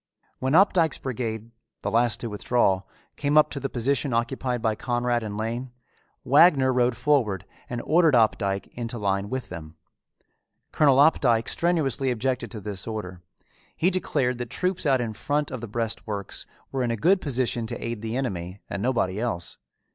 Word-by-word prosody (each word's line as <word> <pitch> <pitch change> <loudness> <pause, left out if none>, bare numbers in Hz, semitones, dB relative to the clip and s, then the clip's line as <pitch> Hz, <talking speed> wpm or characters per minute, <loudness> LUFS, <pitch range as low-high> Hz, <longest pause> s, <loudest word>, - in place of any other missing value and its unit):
When 130 +2 0
Opdycke's 175 -4 +4
brigade, 115 -3 -4 0.3
the 100 - -1
last 115 +1 +2
to 120 - -3
withdraw, 105 -2 +1 0.4
came 145 +1 +1
up 155 - +5
to 140 - -4
the 135 - -3
position 130 +2 0
occupied 125 +1 -1
by 110 -1 +1
Conrad 120 +1 0
and 105 -2 -5
Lane, 120 +3 -3 0.5
Wagner 140 -2 +5
rode 125 -1 +2
forward 110 - +1 0.2
and 120 -1 -4
ordered 160 -3 +4
Opdycke 100 -4 +2
into 120 0 -5
line 100 -1 -1
with 130 0 -4
them. 80 -2 -8 1.0
Colonel 140 -4 +4
Opdycke 125 -6 +4
strenuously 155 -6 +1
objected 125 +2 -1
to 110 - -7
this 100 -2 -6
order. 95 -5 -5 0.5
He 180 +4 +2
declared 140 -9 0
that 120 -2 -4
troops 180 +3 -1
out 135 -3 +3
in 115 -2 -3
front 145 +6 -1
of 130 -3 -5
the 120 - -5
breastworks 110 -2 -4 0.2
were 135 - -1
in 125 - 0
a 115 - -1
good 185 - +3
position 120 -4 -1
to - - -3
aid 115 -2 -5
the 115 +2 -3
enemy 95 -7 -4
and 100 - -3
nobody 115 -6 0
else. 110 -8 -3
120 Hz, 170 wpm, -25 LUFS, 110-135 Hz, 1.0 s, up